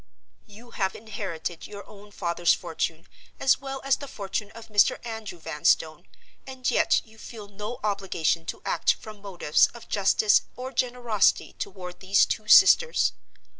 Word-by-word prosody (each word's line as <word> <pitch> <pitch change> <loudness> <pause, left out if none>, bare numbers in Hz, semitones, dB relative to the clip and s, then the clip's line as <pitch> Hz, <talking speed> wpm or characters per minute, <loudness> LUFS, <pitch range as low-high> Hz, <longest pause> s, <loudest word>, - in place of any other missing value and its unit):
"You 225 +3 -15
have 190 -2 -2
inherited 195 -6 -6
your 200 -2 -10
own 205 0 -14
father's 175 -3 +1
fortune, 165 -1 -4 0.3
as 265 - +3
well 270 -1 -6
as 275 -1 +2
the 280 - -8
fortune 205 -2 -5
of 230 0 -12
Mr. 205 -1 +4
Andrew 220 -5 -6
Vanstone, 160 +1 0 0.4
and 260 -1 -2
yet - - +3
you 220 0 -19
feel 215 -3 -10
no 210 +4 -7
obligation 190 -5 -1
to - - -6
act - - +1
from 215 -2 -12
motives 180 -6 +2
of 235 - -12
justice 205 +1 +3
or 255 +1 -6
generosity 240 -4 +1
toward 180 -2 -8
these 195 +1 +3
two 215 - -4
sisters? 475 - +6
205 Hz, 150 wpm, -26 LUFS, 185-230 Hz, 0.4 s, sisters